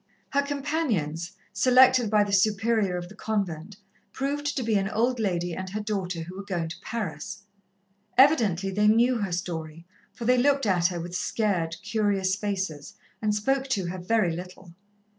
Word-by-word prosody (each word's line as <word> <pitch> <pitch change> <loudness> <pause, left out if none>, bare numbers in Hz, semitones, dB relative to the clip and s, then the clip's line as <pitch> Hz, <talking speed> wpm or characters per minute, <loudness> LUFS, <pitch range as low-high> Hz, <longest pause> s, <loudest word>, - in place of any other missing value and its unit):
Her 280 - +3
companions, 270 - -2 0.2
selected 255 -2 +5
by 210 -1 +4
the 200 -1 -4
Superior 210 -1 +2
of 175 0 -5
the 190 - -13
convent, 200 -4 -3 0.4
proved 290 +2 -2
to 260 - 0
be 225 -1 0
an 195 -1 +1
old 235 +4 0
lady 175 -5 -1
and 185 +2 -5
her 210 +3 -4
daughter 195 -5 -3
who 180 +3 -9
were 195 - -6
going 175 -4 -3
to 165 - -9
Paris. 190 -3 -5 0.7
Evidently 220 - +4
they 210 +2 +2
knew 235 +3 +4
her 200 -3 -2
story, 165 -2 -4 0.3
for 235 - -7
they 250 +1 +4
looked 275 0 +3
at 180 -4 +3
her 175 -2 -4
with 175 +1 -6
scared, 180 -5 0
curious 200 -4 +1
faces 190 -7 -4 0.3
and 210 -1 +1
spoke 270 +6 0
to 195 -9 -1
her 185 +1 -5
very 180 -2 +1
little. 180 0 -10
200 Hz, 170 wpm, -26 LUFS, 180-235 Hz, 0.7 s, selected